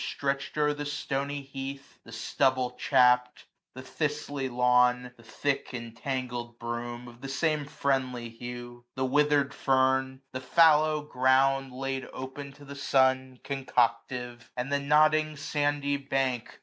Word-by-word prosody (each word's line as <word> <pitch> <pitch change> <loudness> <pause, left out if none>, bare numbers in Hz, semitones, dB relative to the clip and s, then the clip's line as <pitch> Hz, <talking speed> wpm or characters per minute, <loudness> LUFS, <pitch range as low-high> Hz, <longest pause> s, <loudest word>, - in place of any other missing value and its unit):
Stretched 140 +1 -3
o'er 150 0 +3
the 145 0 -5
stony 140 -1 -3
heath; 135 0 -8
the 115 - -12
stubble 130 +2 +1
chapt 125 0 +3
j - - -19 0.3
The 130 - -7
thistly 145 -2 -3
lawn; 125 0 +3
the 115 - -18
thick 135 +4 -2
entangled 120 0 -5
broom; 120 0 -5
405 120 -1 -11
Of - - -24
the 135 - -6
same 150 +1 0
friendly 130 -4 -1
hue, 120 +1 -8
the 130 - 0
withered 145 +1 +2
fern; 130 0 +1
The 130 - -4
fallow 155 +1 +4
ground 135 0 +2
laid 135 +1 -4
open 135 +2 -7
to 145 0 -15
the 140 - -8
sun, 130 -2 +1
Concoctive; 120 -2 -1
and 125 +3 -3
the 140 - +2
nodding 155 +1 +3
sandy 145 -1 0
bank. 135 -3 -2
130 Hz, 140 wpm, -28 LUFS, 125-140 Hz, 0.3 s, fallow